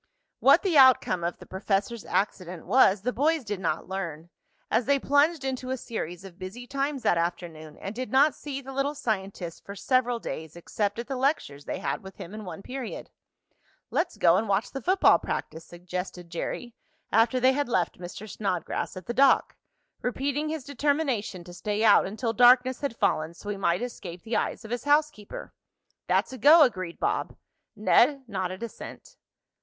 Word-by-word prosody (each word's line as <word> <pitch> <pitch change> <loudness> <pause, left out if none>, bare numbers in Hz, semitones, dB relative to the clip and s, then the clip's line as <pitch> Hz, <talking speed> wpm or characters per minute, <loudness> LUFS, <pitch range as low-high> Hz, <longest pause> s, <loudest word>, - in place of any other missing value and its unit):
What - - +6
the 350 -7 +4
outcome 255 -9 +5
of 170 +1 -2
the - - -13
professor's 200 +4 -2
accident 185 -4 -2
was 200 -6 +4
the 250 - -1
boys 305 +5 +1
did 205 -3 -4
not 165 -3 -2
learn, 170 -3 -5 0.4
as 225 +2 +2
they 280 +1 +3
plunged 285 +2 +2
into 255 -1 -3
a 260 - -1
series 185 -7 -6
of 180 -2 -12
busy 195 +7 -7
times 275 +1 -2
that 170 - +3
afternoon 165 -3 -4
and 195 - -6
did 255 +2 -5
not 280 +3 +5
see 275 -2 -6
the 270 0 -9
little 275 +2 -1
scientist 195 - -4
for 200 - -8
several 245 +3 +1
days 160 -8 -7
except 200 +4 -2
at 235 - -4
the 270 - -4
lectures 255 - -1
they - - -3
had 140 - -3
with 190 0 -11
him 175 - -9
in 215 -1 -7
one 180 +1 -8
period. 260 -3 -6 0.8
"Let's - - -1
go 170 0 +5
and 215 +1 -1
watch 200 +3 0
the 270 - -5
football 375 +9 +4
practice," 160 +1 -5
suggested 180 0 -7
Jerry 235 +7 -4 0.4
after 230 +4 +3
they 260 +1 +4
had 285 -2 -1
left 180 -8 0
Mr. 180 +4 -8
Snodgrass 185 -3 -3
at 185 - -8
the 240 - -3
dock, 270 +1 +4 0.5
repeating 280 +4 -1
his 315 -3 -4
determination 270 - -1
to 175 0 -12
stay 210 +4 -2
out 210 -4 +6
until 225 +3 -2
darkness 250 +2 +5
had 275 -5 -3
fallen 155 +2 0
so 205 - -9
he 205 - -2
might 175 +2 +1
escape 185 -8 -7
the 225 +1 -3
eyes 220 - -2
of 220 - -9
his 245 +3 -3
housekeeper. 290 -7 0 0.5
"That's - - +1
a 260 - -8
go," 310 +3 +8
agreed 185 -10 -1
Bob. - - -1 0.4
Ned 265 +6 +3
nodded 185 -1 -4
assent. 235 - -9
220 Hz, 180 wpm, -27 LUFS, 185-265 Hz, 0.8 s, go